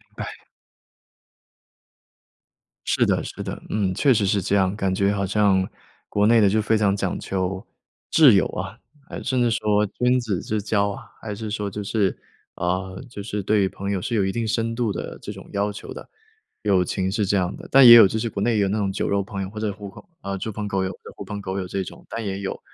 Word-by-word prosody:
哎。 - - -7 2.4
是 - - +2
的 - - +1
是 - - -7
的， - - -6
嗯， 100 -3 0
确 135 +7 +4
实 105 -3 +1
是 100 0 +1
这 100 - 0
样， 95 0 +2
感 95 -3 -1
觉 100 +1 +2
好 100 -1 -1
像 95 -1 +2 0.4
国 105 0 +2
内 115 0 +5
的 100 - +5
就 110 +2 +2
非 110 +1 +2
常 100 -2 +2
讲 - - -2
究 95 0 -3 0.5
挚 150 -6 +7
友 95 - +4
啊。 95 +4 -6 0.3
还 - - -6
甚 130 -1 0
至 120 - +3
说 105 -1 +2
君 125 +5 +1
子 105 -7 -2
之 105 -1 -2
交 100 -1 +1
啊， 100 - -7 0.2
还 105 -2 -5
是 110 0 -6
说 105 -1 -2
就 105 +1 -5
是 100 -2 0 0.4
呃， 95 +1 -2
就 105 - -8
是 105 -1 -4
对 100 -1 +2
朋 100 +1 -5
友 95 - -1
是 115 - -2
有 100 -3 +2
一 95 - 0
定 115 0 -2
深 115 +1 0
度 115 -3 -1
的 - - -6
这 - - -6
种 - - -11
要 100 +1 0
求 100 - -8
的， - - -11 0.5
友 95 -4 +3
情 95 +1 -2
是 105 0 0
这 100 - +1
样 90 -1 -1
的。 - - -11
但 135 -1 +8
也 120 - +12
有 115 -4 +9
就 110 - -3
是 115 +1 -1
国 100 - -4
内 120 +2 +2
也 - - +1
有 100 - +2
那 105 - 0
种 100 -2 0
酒 95 - -2
肉 100 0 +1
朋 100 0 -5
友， 95 - -4
或 105 +1 -8
者 105 -2 -1
狐 100 0 -9
朋 95 - -13 0.2
呃， 100 0 -4
猪 110 - -4
朋 105 0 -4
狗 95 -1 0
友、 95 - -2 0.2
狐 - - -7
朋 105 - -6
狗 95 0 -3
友 90 - -4
这 95 +1 -2
种， - - -11
但 115 -1 -4
也 95 -1 -3
有。 100 -1 -4
100 Hz, 255 characters per minute, -23 LUFS, 95-110 Hz, 2.4 s, 也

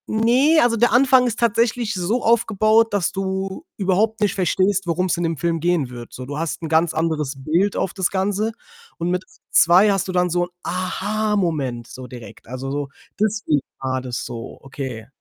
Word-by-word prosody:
Ne, 250 +8 +3
also, 235 -1 +3
der 240 +2 +3
Anfang 255 0 +5
ist 235 -1 -3
tatsächlich 230 0 +1
so 195 +6 -1
aufgebaut, 225 0 +3
dass 200 -4 +1
du 190 - -3
überhaupt 210 +3 +1
nicht 210 -3 +1
verstehst, 190 0 +1
worum's 180 +2 +1
in 175 - -1
dem 165 -1 -1
Film 170 +2 -1
gehen 170 -5 +1
wird. 120 -1 -9
So, 130 - -7
du 145 +3 -5
hast 165 0 -3
'n 160 - -3
ganz 160 +1 +2
anderes 155 -3 -1
Bild 165 +9 0
auf 185 - -1
das 190 -2 0
Ganze 200 +3 0 0.5
und 170 0 -2
mit 180 +1 -1 0.3
2 185 +5 +6
hast 195 -1 0
du - - -3
dann 180 -1 +1
so 175 +1 +1
'n - - -16
Aha-Moment 180 - -1
so 130 0 -9
direkt. 120 -2 -12
Also, 130 +3 -5
so, 145 0 -3 0.3
deswegen 210 -9 +1 0.2
war 130 -1 -2
das 125 0 -4
so, 115 -1 -7
okay. 130 -5 -7
185 Hz, 185 wpm, -21 LUFS, 150-215 Hz, 0.5 s, 2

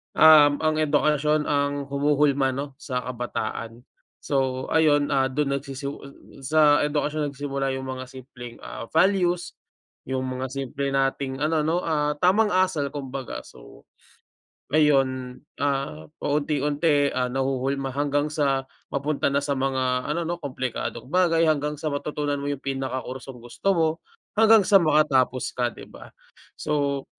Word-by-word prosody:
um, 150 -1 +7
ang 155 0 +2
edukasyon 150 0 +2
ang 145 -1 0 0.2
humuhulma 140 -2 +2
'no, 140 +1 -4
sa 125 -2 -3
kabataan. 120 -1 -5 0.4
So, 130 -2 -1
ayun, 145 -3 +3
ah, 135 -1 +2
do'n 140 0 -1
nagsisi 140 0 -6 0.5
sa 145 +2 +4
edukasyon 150 0 -1
nagsimula 140 -1 -3
yung 130 0 -5
mga 130 0 -5
simpleng, 125 -2 -11
ah, 115 - -7
values, 180 0 +2 0.5
yung 130 0 -2
mga 130 0 -4
simple 140 +1 -3
nating 135 0 0
ano, 155 +1 +1
'no, 170 +3 +1
ah, 150 -2 0
tamang 205 +4 +4
asal, 185 -6 +1
kumbaga. 135 -2 -5
So, - - -16 0.9
ayun, 135 -4 +2 0.2
ah, 135 - -2
paunti-unti, 145 0 +1
ah, 125 -1 0
nahuhulma 135 0 -1
hanggang 145 +1 0
sa 135 -3 +1 0.3
mapunta 140 +1 0
na 140 - +2
sa 145 - -1
mga 130 -1 0
ano 155 +3 -1
'no, 170 +1 -2
komplikadong 130 -4 -4
bagay, 170 -2 +3
hanggang 150 0 0
sa 155 +2 -3
matutunan 145 0 -2
mo 140 - -3
yung 140 -1 -4
pinaka 135 -1 -2
kursong 130 -1 -8
gusto 120 +10 -4
mo, 160 -1 +3 0.5
hanggang 225 -2 +7
sa 195 0 +6
makatapos 145 -5 +2
ka, 125 -1 +1
'di - - -11
ba? - - -13 0.5
So 140 -2 -1
140 Hz, 140 wpm, -24 LUFS, 130-150 Hz, 0.9 s, um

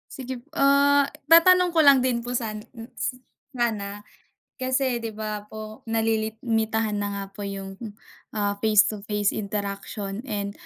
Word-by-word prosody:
Sige, 255 -2 -6
ah, 280 -1 +4 0.2
tatanong 360 +2 +7
ko 330 - +1
lang 280 -4 +7
din 250 -2 +1
po 245 +1 -4
sana 220 -3 -2 0.4
s 255 - -1 0.4
sana, 205 -4 -2 0.6
kasi 260 -1 0
di 230 - -4
ba 215 -1 -5
po 215 0 -9
nalilimitahan 220 -1 0
na 205 - -1
nga 200 - -3
po 205 - -11
yung, 195 0 -7 0.6
ah, 205 -1 +1
face 215 -1 +5
to 215 -2 -3
face 210 -1 +1
interaction 200 0 -4
and 200 -2 -2
220 Hz, 140 wpm, -25 LUFS, 205-255 Hz, 0.6 s, tatanong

